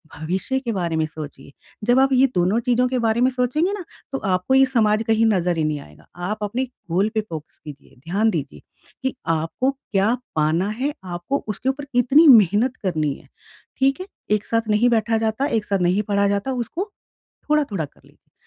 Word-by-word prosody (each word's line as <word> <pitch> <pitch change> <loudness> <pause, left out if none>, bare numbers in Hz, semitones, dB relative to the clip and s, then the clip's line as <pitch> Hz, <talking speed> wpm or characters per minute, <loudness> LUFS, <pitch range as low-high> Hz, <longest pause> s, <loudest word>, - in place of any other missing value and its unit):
भविष्य 185 - -2
के 240 -3 -3
बारे 175 -5 -2
में 160 - +1
सोचिए। 145 -3 -10 0.4
जब 245 +2 +5
आप 270 0 +4
ये 260 +1 +5
दोनों 185 +6 +2
चीज़ों 250 +1 +2
के 255 0 -1
बारे 225 +1 +1
में 255 - +5
सोचेंगे 260 +9 0
ना, 400 -3 -5 0.3
तो 270 - -1
आपको 185 +6 +1
ये 270 0 +7
समाज 220 -4 +2
कहीं 225 0 +3
नज़र 180 -5 +1
ही 160 - +1
नहीं 155 -1 -1
आएगा। 75 0 -17
आप 180 +5 -3
अपने 235 +6 -1 0.3
गोल 195 +5 +2
पे 220 - +2
फ़ोकस 160 -7 -9
कीजिए, 145 -2 -12
ध्यान 205 +5 +2
दीजिए 150 -6 -4 0.4
कि 265 0 -1 0.2
आपको 165 - -1
क्या 220 -5 0 0.2
पाना 160 +5 +1
है, 260 +7 -2
आपको 175 +9 -3
उसके 210 +5 -2
ऊपर 280 +1 -3
कितनी 265 +6 +5
मेहनत 225 - +6
करनी 155 -6 0
है। - - -15 0.5
ठीक 270 +4 +2
है? 370 - -7 0.2
एक 210 -1 +1
साथ 230 -1 -1
नहीं 215 +4 +4
बैठा 225 -1 +2
जाता, 220 +4 0
एक 220 -5 -1
साथ 200 -1 0
नहीं 180 +3 +2
पढ़ा 200 0 +2
जाता, 200 +6 -1
उसको 320 - -4 0.6
थोड़ा-थोड़ा 245 - +1
कर - - -22
लीजिए। - - -26
215 Hz, 195 wpm, -22 LUFS, 180-255 Hz, 0.6 s, ये